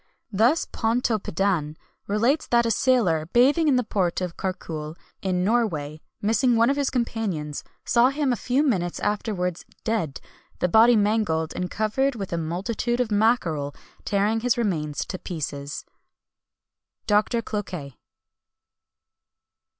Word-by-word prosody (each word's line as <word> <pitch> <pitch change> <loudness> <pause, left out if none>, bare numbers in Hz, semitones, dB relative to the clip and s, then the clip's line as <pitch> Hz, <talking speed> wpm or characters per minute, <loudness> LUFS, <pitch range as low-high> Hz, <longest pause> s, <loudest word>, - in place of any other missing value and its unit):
Thus 230 - +3
Pontoppidan 200 -8 0 0.3
relates 230 +9 +1
that 235 0 +3
a 230 - +1
sailor, 205 -11 +2
bathing 285 +7 +4
in 280 - +4
the 250 - +2
port 185 -6 0
of 180 -2 -4
Carcule, 160 -5 -5 0.3
in 180 -2 0
Norway, 170 -9 0 0.2
missing 230 +3 +3
one 230 +3 +4
of - - 0
his 280 -1 0
companions, 210 - -2 0.2
saw 240 +1 +4
him 275 -2 0
a - - 0
few 255 +5 +1
minutes 180 - 0
afterwards 200 -4 -1 0.2
dead, 170 - -1 0.4
the - - +1
body 225 +6 +6
mangled 205 -7 +1
and 180 0 -2
covered 240 +7 0
with 195 -5 -5
a - - 0
multitude 200 +9 -2
of 245 -3 0
mackerel, 180 -10 +1 0.3
tearing 205 +2 +1
his 245 +1 +1
remains 155 -10 -1
to 185 - -6
pieces." 145 -4 -5 1.2
DR. 210 0 +5 0.2
CLOQUET. 180 - -5
210 Hz, 130 wpm, -24 LUFS, 170-235 Hz, 1.2 s, body